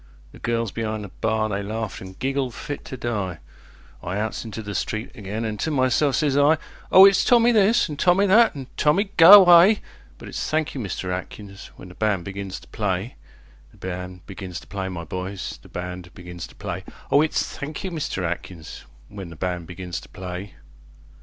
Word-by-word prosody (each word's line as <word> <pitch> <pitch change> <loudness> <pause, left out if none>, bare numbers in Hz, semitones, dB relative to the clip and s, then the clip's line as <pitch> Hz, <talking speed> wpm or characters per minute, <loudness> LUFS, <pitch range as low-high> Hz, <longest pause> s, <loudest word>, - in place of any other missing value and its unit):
"The - - -14
girls 115 -2 -1
be'ind 110 -2 -3
the 100 - -8
bar 110 +3 -1
they 100 -1 -2
laughed 110 0 -4
an' 95 0 -10
giggled 135 -2 -2
fit 145 - -6
to 130 - -7
die,I 95 -4 -6
outs 110 +1 -3
into 110 -1 -7
the 105 0 -6
street 110 +3 -3
again 110 -1 -5
an' 110 -1 -3
to 160 - -2
myself 135 0 +2
sez 145 -3 +1
I: 145 +3 +5 0.3
O 190 +1 +10
it's 195 -1 +5
Tommy 240 -1 +5
this, 215 0 +4
an' 150 - -6
Tommy 180 +5 +4
that, 220 +2 +5
an' 135 -2 -6
"Tommy, 195 +7 +2
go 165 +4 +10
away"; 185 +1 +9 0.4
But - - -11
it's - - -4
"Thank 155 -1 0
you, 135 - -4
Mister 95 -2 -4
Atkins", 95 +2 -7
when 90 - -12
the - - -12
band 105 -3 0
begins 100 -1 -6
to - - -17
play, 100 +2 -2 0.6
The - - -22
band 90 0 -7
begins 95 -2 -7
to - - -15
play, 95 -1 -4
my 85 -2 -5
boys, 95 +4 -5
the - - -17
band 90 0 -6
begins 90 -1 -8
to - - -18
play, - - -5 0.3
O 145 - +6
it's 155 - +1
"Thank 145 +5 -6
you, 190 - -3
Mister 155 - -3
Atkins", 85 -1 -6 0.2
when 100 -4 -9
the 85 - -10
band 90 0 -3
begins 90 -1 -6
to - - -15
play. 90 +2 -7
110 Hz, 195 wpm, -23 LUFS, 95-145 Hz, 0.6 s, O